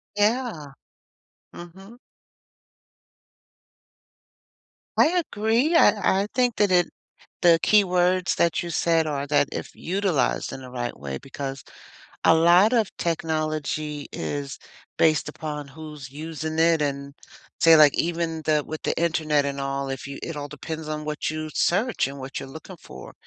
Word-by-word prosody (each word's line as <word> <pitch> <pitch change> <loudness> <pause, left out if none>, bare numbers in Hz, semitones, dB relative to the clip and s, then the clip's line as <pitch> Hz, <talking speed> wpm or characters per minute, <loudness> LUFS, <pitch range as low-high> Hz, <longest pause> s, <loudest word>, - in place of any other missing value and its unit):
Yeah. 210 - 0 0.8
Mhm. 190 +7 -12 3.0
I - - +6 0.2
agree 230 +10 +1
I 205 - +4
I - - -5
think 245 -2 +1
that 205 -2 +3
it 175 -1 +4 0.6
the 170 -2 +6
keywords 185 -2 +3
that 170 -2 +1
you 175 - -5
said 165 -1 +2
are 145 -2 -2
that 145 -1 +2
"if - - -6
utilized 180 -8 -1
in - - -7
the 130 -1 -10
right 120 -1 -4
way," 70 -1 -6
because 135 -1 -7 0.6
a 160 - +6
lot 175 +6 +5
of 225 -5 +1
technology 155 -3 -2
is 140 -1 -5 0.4
based 155 -2 +3
upon 150 -2 -6
who's 150 -2 -10
using 155 +1 -5
it 165 -1 +4
and 140 0 -3 0.5
say 165 -1 +7
like 150 -2 +6
even 165 -1 -1
the 150 -1 +2
with 155 0 -7
the - - -1
internet 155 -3 +1
and 140 0 -3
all, 135 0 -3
if 135 -1 -5
you 140 - -7
it 165 - -5
all 145 0 -5
depends 155 +2 -7
on 155 0 -4
what 150 0 -3
you 155 0 -5
search 215 - +1
and 140 +1 -8
what 130 0 -6
you're - - -8
looking 160 +6 -10
for- - - -12
160 Hz, 145 wpm, -24 LUFS, 145-180 Hz, 3.0 s, say